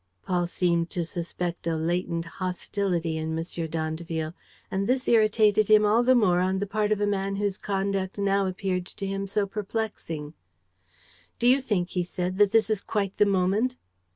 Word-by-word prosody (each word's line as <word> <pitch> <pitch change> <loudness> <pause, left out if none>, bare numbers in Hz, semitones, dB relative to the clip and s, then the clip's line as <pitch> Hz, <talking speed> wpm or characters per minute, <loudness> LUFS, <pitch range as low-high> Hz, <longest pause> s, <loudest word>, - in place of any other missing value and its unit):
Paul 175 -1 0
seemed 170 -1 +1
to 170 - 0
suspect 170 0 -4
a 165 - +1
latent 170 +1 -1
hostility 180 -1 -2
in 160 0 -2
M. 165 0 -4
d'Andeville; 160 0 -3 0.4
and 195 +1 -1
this 255 +1 +1
irritated 215 -2 +4
him 215 0 +6
all 215 +3 +4
the 255 +1 +4
more 185 -7 +4
on 185 +1 +1
the 200 - -1
part 210 +1 -1
of 210 - +2
a 205 - +2
man 195 -1 -1
whose 200 -1 -1
conduct 195 -1 -2
now 200 -1 +2
appeared 185 -1 -2
to 195 - -6
him 195 0 -3
so 200 +1 0
perplexing: 195 -7 -4 1.0
"Do - - -2
you 260 +3 +5
think," 200 -8 -1
he 180 - -1
said, 180 +2 -3
"that 205 -1 +6
this 220 0 +3
is 210 -2 0
quite 200 -3 -2
the 210 - +5
moment?" 200 +6 +1
195 Hz, 180 wpm, -26 LUFS, 175-210 Hz, 1.0 s, him